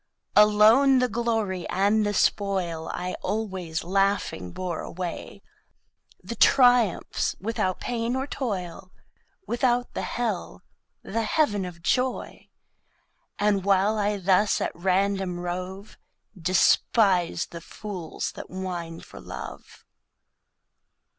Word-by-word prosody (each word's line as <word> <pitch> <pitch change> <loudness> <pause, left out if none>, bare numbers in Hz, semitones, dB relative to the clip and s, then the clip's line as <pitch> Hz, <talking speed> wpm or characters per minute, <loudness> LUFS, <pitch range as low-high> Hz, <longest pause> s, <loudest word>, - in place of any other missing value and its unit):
Alone 215 +6 +6
the 250 0 +3
Glory 220 -5 -2
and 205 +3 +2
the 205 0 0
Spoil 185 -5 0
I 180 +1 -4
always 190 -6 -3
Laughing 190 - 0
bore 175 - -4
away; 180 -1 -6 0.8
The - - -6
Triumphs, 245 -7 +3
without 190 -3 -2
Pain 235 0 -2
or 265 +1 -1
Toil, 190 -9 -5 0.5
Without 245 0 0
the - - -3
Hell, 230 -6 -3 0.4
the 230 +3 -2
Heav'n 215 -5 +1
of 170 -2 -9
Joy. 255 +7 -1 0.9
And 205 -2 +1
while 200 +2 +2
I 205 0 0
thus 195 +2 +2
at - - -1
random 190 0 0
rove 185 +3 -6 0.4
Despise 185 +1 +2
the 170 - -8
Fools 185 -3 -6
that - - -10
whine 175 -3 -5
for 65 - -12
Love. - - -9
195 Hz, 110 wpm, -26 LUFS, 180-220 Hz, 0.9 s, Alone